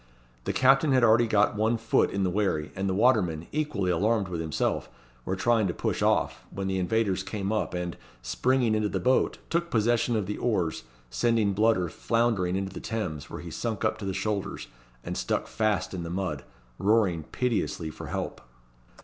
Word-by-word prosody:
The - - 0
captain 135 +2 +4
had 130 -2 +4
already 115 +1 +5
got 105 -1 +3
one 110 +2 +1
foot 115 0 +2
in 100 0 -1
the 90 - +1
wherry, 90 -6 0
and 95 +1 -1
the 95 - 0
watermen, 95 -9 +2
equally 140 -12 -1
alarmed 100 +2 +1
with 85 -2 -3
himself, 80 -2 -1 0.4
were 95 - -1
trying 110 +1 +2
to 90 - -3
push - - -2
off, - - +1
when 100 - -5
the 95 0 -1
invaders 95 0 +1
came 100 0 -3
up, 110 -4 -1
and, 90 -1 -3 0.3
springing 115 - +1
into 110 -1 +1
the - - -2
boat, 130 +1 +2
took 170 0 0
possession 120 0 +2
of 105 -3 0
the 105 +2 -4
oars, 95 -9 -1 0.3
sending 105 - +2
Bludder 105 -3 +2
floundering 110 -2 0
into 95 0 -3
the - - -6
Thames, 95 -11 -4
where - - -7
he - - -8
sunk 110 -3 -3
up 110 - 0
to 105 - -5
the 95 - -1
shoulders, 100 0 -3 0.3
and - - -4
stuck - - -1
fast 105 -4 -1
in 90 - -4
the 85 - -5
mud, 85 -6 -3 0.3
roaring 100 -5 +2
piteously 90 -3 -2
for - - -9
help. - - -4
105 Hz, 190 wpm, -27 LUFS, 90-115 Hz, 0.4 s, already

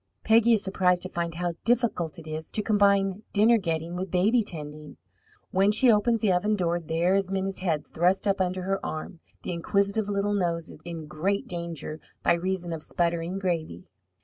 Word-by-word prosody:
Peggy 230 +1 +5
is 215 - +2
surprised 180 -2 +1
to 185 - -5
find 170 -2 -3
how 175 0 -2
difficult 235 -9 0
it 165 - -11
is 155 0 -6
to 215 - -2
combine 200 -2 +3
dinner 220 +3 +5
getting 165 -2 -2
with 185 +1 -3
baby 205 +7 +3
tending. 150 -6 -7 0.5
When 195 +2 +3
she 240 +3 +5
opens 225 +1 +2
the 210 - +3
oven 205 +4 +2
door, 175 -3 0
there 165 +3 0
is 195 -1 +1
Minna's 195 0 -2
head 165 -5 0
thrust 180 +5 +2
up 200 -1 +1
under 185 0 -1
her 195 +1 -2
arm, 160 +2 -5 0.2
the - - -3
inquisitive 200 +4 0
little 205 0 0
nose 170 -4 -1
in 165 -2 -6
great 185 +7 -1
danger 170 -3 -5 0.2
by - - +4
reason 175 0 -2
of 160 - -5
sputtering 170 +2 -1
gravy. 165 - -2
185 Hz, 180 wpm, -27 LUFS, 170-200 Hz, 0.5 s, Peggy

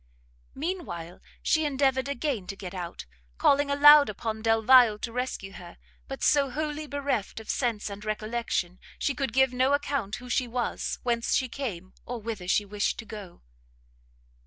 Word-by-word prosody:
Mean 350 +5 -3
while 170 +1 -8 0.2
she 315 - +2
endeavoured 270 -2 +1
again 275 -8 -2
to 195 - -5
get 190 -2 -8
out, 175 -2 -6 0.3
calling 285 0 +3
aloud 290 0 +8
upon 220 +1 -4
Delvile 225 0 +5
to 230 - -5
rescue 245 -5 -4
her, 175 -2 -11 0.3
but 270 - -6
so 280 -2 +4
wholly 300 +2 -3
bereft 280 -8 -2
of 220 - -4
sense 235 -5 -1
and 205 0 -7
recollection, 215 -4 -2 0.2
she 285 - 0
could 270 -3 -2
give 265 +1 +3
no 260 +2 +2
account 280 -7 -1
who 250 +3 -10
she 250 +1 0
was, 240 0 -2
whence 235 -1 0
she 260 - +1
came, 205 -9 -6
or 245 -1 -5
whither 215 -5 -6
she 205 +2 +2
wished 205 0 -1
to 225 - -7
go. 205 - -10
240 Hz, 165 wpm, -27 LUFS, 210-275 Hz, 0.3 s, aloud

